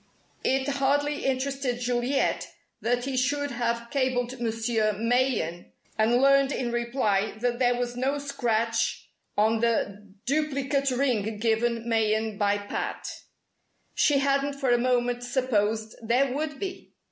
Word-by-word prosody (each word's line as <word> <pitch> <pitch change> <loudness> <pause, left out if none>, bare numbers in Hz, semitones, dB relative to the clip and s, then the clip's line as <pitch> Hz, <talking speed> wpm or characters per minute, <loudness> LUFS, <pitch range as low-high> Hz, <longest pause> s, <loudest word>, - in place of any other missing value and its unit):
It 265 +1 +1
hardly 285 +1 +1
interested 270 -1 -1
Juliet 245 +2 0 0.3
that 245 +2 0
he 270 -1 -2
should 285 +3 0
have 235 -1 -2
cabled 255 -2 -1
Monsieur 225 -1 0
Mayen 230 -6 0 0.2
and 220 +2 +3
learned 275 +1 +4
in 245 -3 -2
reply 235 -4 0
that 240 +1 -1
there 245 -1 +3
was 245 0 -2
no 265 +3 0
scratch 235 -5 -1 0.3
on 220 +2 +3
the 210 -3 -1
duplicate 280 -1 0
ring 240 -5 0
given 230 +1 0
Mayen 220 -2 +1
by 205 0 +2
Pat. 205 0 -4 0.9
She 290 -2 +3
hadn't 275 0 +1
for 275 -2 0
a 240 - +4
moment 245 0 +1
supposed 225 -4 0
there 250 +4 +2
would 300 0 -3
be! 390 -1 -6
245 Hz, 130 wpm, -27 LUFS, 225-275 Hz, 0.9 s, learned